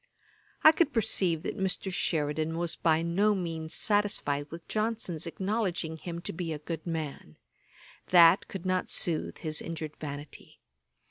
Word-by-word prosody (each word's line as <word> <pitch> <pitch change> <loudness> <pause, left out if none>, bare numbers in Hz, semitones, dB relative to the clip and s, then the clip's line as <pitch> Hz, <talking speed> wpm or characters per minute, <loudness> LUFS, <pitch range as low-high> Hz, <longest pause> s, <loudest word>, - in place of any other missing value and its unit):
I 310 - +10
could 320 -2 +1
perceive 185 -7 +2
that - - -4
Mr. 190 0 -2
Sheridan 155 -1 0
was 170 -1 0
by 160 -1 +2
no 200 +5 +2
means 165 -3 -3
satisfied 200 -9 +1
with 165 0 -9
Johnson's 215 -7 -1
acknowledging 185 -2 -2
him 170 +2 -6
to - - -5
be 165 0 -3
a - - -4
good 160 +2 -6
man. 155 - -4 0.7
That 180 +2 +7
could 190 -2 -7
not 185 0 0
sooth 165 -3 -1
his 155 -2 -3
injured 160 -2 -5
vanity. 145 -1 -8
170 Hz, 145 wpm, -29 LUFS, 160-190 Hz, 0.7 s, I